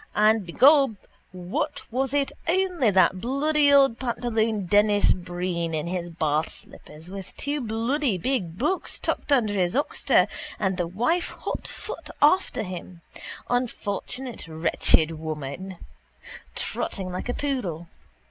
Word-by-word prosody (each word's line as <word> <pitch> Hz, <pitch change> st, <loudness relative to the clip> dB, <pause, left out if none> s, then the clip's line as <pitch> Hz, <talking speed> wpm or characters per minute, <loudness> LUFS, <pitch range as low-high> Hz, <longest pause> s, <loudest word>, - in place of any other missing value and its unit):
And 215 Hz, -2 st, +3 dB
begob 275 Hz, -, +5 dB, 0.4 s
what 180 Hz, 0 st, -3 dB
was 260 Hz, +2 st, 0 dB
it 285 Hz, -1 st, +1 dB, 0.2 s
only 360 Hz, -, +2 dB
that 185 Hz, -1 st, +3 dB
bloody 285 Hz, +4 st, +2 dB
old 270 Hz, -4 st, +5 dB
pantaloon 230 Hz, -4 st, -1 dB
Denis 205 Hz, +2 st, +4 dB
Breen 175 Hz, -2 st, -3 dB
in 155 Hz, -, -2 dB
his 175 Hz, 0 st, -3 dB
bathslippers 155 Hz, +1 st, -4 dB
with 195 Hz, -2 st, -8 dB
two 285 Hz, +1 st, -2 dB
bloody 235 Hz, +1 st, 0 dB
big 180 Hz, -5 st, -2 dB
books 305 Hz, -, -1 dB
tucked -, -, -3 dB
under 230 Hz, -7 st, +3 dB
his 180 Hz, -1 st, 0 dB
oxter 285 Hz, -, +2 dB, 0.3 s
and 190 Hz, -2 st, 0 dB
the 175 Hz, -2 st, -1 dB
wife 245 Hz, -, 0 dB
hotfoot -, -, -5 dB
after 335 Hz, -, +3 dB
him, 180 Hz, -2 st, -8 dB, 0.5 s
unfortunate 245 Hz, -1 st, -2 dB
wretched 160 Hz, 0 st, +2 dB
woman, 155 Hz, +4 st, -6 dB, 0.8 s
trotting 185 Hz, -2 st, -2 dB
like 185 Hz, +6 st, -5 dB
a 245 Hz, -, -1 dB
poodle. 195 Hz, -, -3 dB
210 Hz, 120 wpm, -25 LUFS, 175-265 Hz, 0.8 s, begob